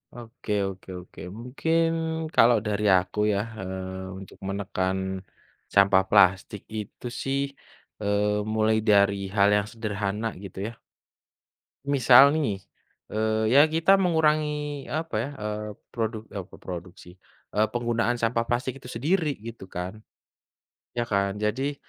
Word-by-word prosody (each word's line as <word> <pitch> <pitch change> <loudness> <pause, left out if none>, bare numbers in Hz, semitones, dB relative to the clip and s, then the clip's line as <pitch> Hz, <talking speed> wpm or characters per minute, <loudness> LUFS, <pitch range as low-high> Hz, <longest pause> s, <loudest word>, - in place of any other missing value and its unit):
Oke 115 -2 -8 0.2
oke 95 0 -9
oke, 90 - -14 0.2
mungkin 160 +7 +1 0.5
kalau 120 +1 +6
dari 105 0 -1 0.2
aku 90 +3 -6
ya, 100 - +1 0.2
eee, 95 0 -5
untuk 95 - -12
menekan, 95 -1 -1 0.8
sampah 100 -1 +5
plastik 95 0 +4 0.2
itu 105 +3 -9 0.2
sih, 135 0 0 0.6
eee, 105 0 +1
mulai 110 0 +3
dari 100 -1 +5 0.2
hal 100 -1 +5
yang 105 0 +1
sederhana 105 -1 -2 0.2
gitu 95 -2 -10
ya. 115 0 -10 1.1
Misal 140 0 +7
nih, 140 -11 0 0.6
eee, 110 +1 +1
ya 140 - +9
kita 165 +5 +4
mengurangi 150 -4 +1
apa 160 -2 -3
ya, 125 - -3
eee, 105 0 -4 0.2
produk 110 -1 -2
oh, 100 -3 -4
kok - - -14
produk 90 -1 -6
sih, 90 - -13 0.4
eee, 105 +1 +3
penggunaan 120 0 0
sampah 115 0 +1
plastik 130 +2 -2
itu 125 - -10
sendiri 150 +5 0
gitu 110 -3 -10
kan, 90 +5 -6 0.9
ya 120 - +1
kan 100 -3 0
jadi, 120 +8 -1
110 Hz, 130 wpm, -26 LUFS, 100-130 Hz, 1.1 s, ya